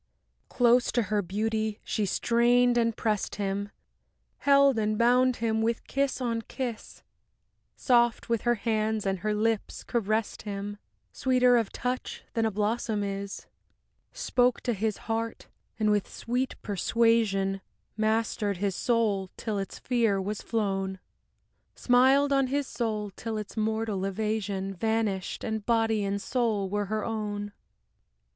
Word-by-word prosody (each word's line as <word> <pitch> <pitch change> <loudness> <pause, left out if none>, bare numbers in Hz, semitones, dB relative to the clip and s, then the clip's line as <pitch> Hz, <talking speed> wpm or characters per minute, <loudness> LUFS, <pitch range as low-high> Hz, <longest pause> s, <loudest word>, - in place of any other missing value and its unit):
V - - -48 0.5
Close 245 0 +4
to 240 - +1
her 210 0 0
beauty 215 +3 -2
she 210 -3 -1
strained 240 +4 +3
and 230 -2 +1
pressed 215 -3 -1
him, 200 0 -2 0.7
Held 280 -3 +5
and 215 0 0
bound 250 +2 +4
him 220 -1 0
with 230 +1 -1
kiss 275 -1 -1
on 230 -3 -1
kiss; 240 -1 -6 0.7
Soft 240 -2 +2
with 230 -2 0
her 240 0 +2
hands 220 -1 -1
and 195 -1 0
her 210 +3 -1
lips 220 0 -1
caressed 220 -2 -1
him, 205 0 -5 0.3
Sweeter 250 -1 +3
of 230 -4 +1
touch 250 +1 -4
than 225 -1 +1
a - - +1
blossom 215 +1 -1
is. 200 0 -5 0.7
Spoke 250 0 +1
to 240 - 0
his 215 0 -1
heart, 225 0 -3 0.3
and 215 -1 +3
with 205 -2 +1
sweet 250 +3 -2
persuasion 205 -2 +1 0.3
Mastered 215 -2 0
his 195 0 -1
soul 210 -5 +1
till 215 -3 -2
its 195 - -5
fear 230 -5 +1
was 205 +2 -3
flown; 195 -4 -1 0.8
Smiled 265 +3 +4
on 275 -1 +3
his 280 +2 0
soul 215 -5 -3
till 220 +3 -5
its 210 -1 -6
mortal 220 -2 -1
evasion 195 -1 -2
Vanished, 215 -1 -1
and 220 -1 -2
body 225 -2 +2
and 200 0 -1
soul 220 -3 0
were 205 0 0
her 215 +1 -2
own. 205 -2 -3
220 Hz, 140 wpm, -28 LUFS, 205-235 Hz, 0.8 s, Held